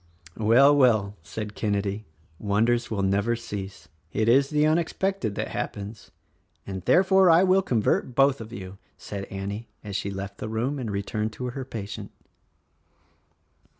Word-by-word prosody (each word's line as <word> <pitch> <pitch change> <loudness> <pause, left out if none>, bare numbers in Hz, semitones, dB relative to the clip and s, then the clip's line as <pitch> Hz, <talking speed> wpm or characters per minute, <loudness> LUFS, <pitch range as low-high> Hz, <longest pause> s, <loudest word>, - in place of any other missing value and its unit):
"Well, 125 +7 +6
well," 110 -7 +3
said 105 +6 -6
Kenedy 100 0 -2 0.2
— 80 - -35
"wonders 115 +4 +1
will 100 -3 -1
never 100 +4 +1
cease. 100 -6 -7 0.2
It 110 +5 0
is 135 +4 +4
the 150 0 +2
unexpected 165 - 0
that - - -3
happens 100 +1 -5 0.2
— 90 +3 -41
" - - -43
"And 95 -1 -5
therefore 190 0 +5
I 165 +2 +6
will 190 0 +4
convert 120 - 0
both 135 -2 +4
of 110 0 -9
you," 95 -3 -8 0.2
said 100 -1 -6
Annie 100 +4 -5 0.2
as 100 -2 -6
she 100 0 -2
left 100 0 -6
the 110 - -4
room 125 +6 -1
and 120 -4 -4
returned 105 +2 -2
to 125 - -6
her 135 +1 -5
patient. 105 -5 -6
110 Hz, 160 wpm, -26 LUFS, 100-130 Hz, 0.2 s, Well